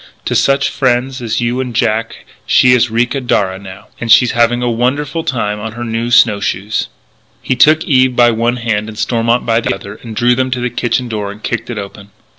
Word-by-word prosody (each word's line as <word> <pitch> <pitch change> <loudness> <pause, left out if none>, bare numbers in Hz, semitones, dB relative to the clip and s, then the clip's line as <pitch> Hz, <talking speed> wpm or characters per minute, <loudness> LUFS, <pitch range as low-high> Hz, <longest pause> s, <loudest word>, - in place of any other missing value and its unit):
To - - -1
such 135 0 +2
friends 130 0 -1
as 115 0 -2
you 120 +2 -1
and 125 -3 -4
Jack 115 0 -1 0.2
she 125 - +5
is 125 -1 +3
Ricca 120 +4 0
Darragh 95 -6 -1
now... 95 -1 -11
and 120 -1 -2
she's 125 0 +6
having 120 +1 +1
a - - 0
wonderful 140 +7 -1
time 105 -9 -2
on 110 +1 -6
her 120 +1 -6
new 115 0 -3
snow 105 -3 +4
shoes 100 +1 -2 0.3
" - - -38
He 130 - 0
took 155 +5 +4
Eve 130 -2 +2
by 120 -1 +5
one 115 +2 0
hand 110 -3 -2
and 110 - -10
Stormont 115 +1 0
by 115 0 +1
the 100 - -1
other, 100 +1 -10
and 115 -2 -9
drew 120 +3 +3
them 130 +1 0
to 125 0 -2
the 125 0 -2
kitchen 120 +1 -1
door 105 -3 -4
and 105 +1 -13
kicked 120 +1 -3
it 120 - -5
open. 100 0 -8
120 Hz, 225 wpm, -14 LUFS, 110-125 Hz, 0.3 s, she's